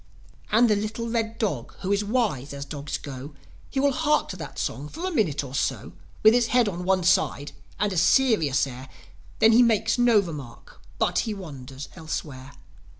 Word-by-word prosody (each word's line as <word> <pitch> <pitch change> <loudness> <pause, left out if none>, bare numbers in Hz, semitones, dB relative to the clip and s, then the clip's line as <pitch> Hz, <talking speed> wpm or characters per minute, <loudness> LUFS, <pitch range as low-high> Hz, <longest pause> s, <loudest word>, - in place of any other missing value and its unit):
And 230 +3 +5
the 215 - +3
little 215 +3 -3
red 225 -1 -2
dog, 150 - -3
who 190 - -2
is 200 +1 +2
wise 200 - -1
as 140 0 -6
dogs 145 0 -5
go, 140 +1 -9 0.3
He 270 - -2
will 280 +1 +3
hark 300 +2 +1
to 185 - -6
that 165 - -8
song 140 +5 -3
for 340 - -6
a 375 - -1
minute 190 - 0
or 130 -2 -9
so, 115 - -2 0.3
'With 220 +1 +8
his 240 -1 +3
head 245 -2 +3
on 180 -2 -4
one 190 -1 +2
side, 145 -4 +2 0.3
and 205 -2 +1
a - - -3
serious 175 - +3
air. 130 0 -9 0.5
Then 220 - +6
he 230 +2 +6
makes 225 0 +2
no 240 -2 +5
remark; 150 - -5 0.2
but - - +1
he 220 -2 -2
wanders 140 -7 -9
elsewhere. 145 -5 -6
185 Hz, 190 wpm, -25 LUFS, 140-225 Hz, 0.5 s, With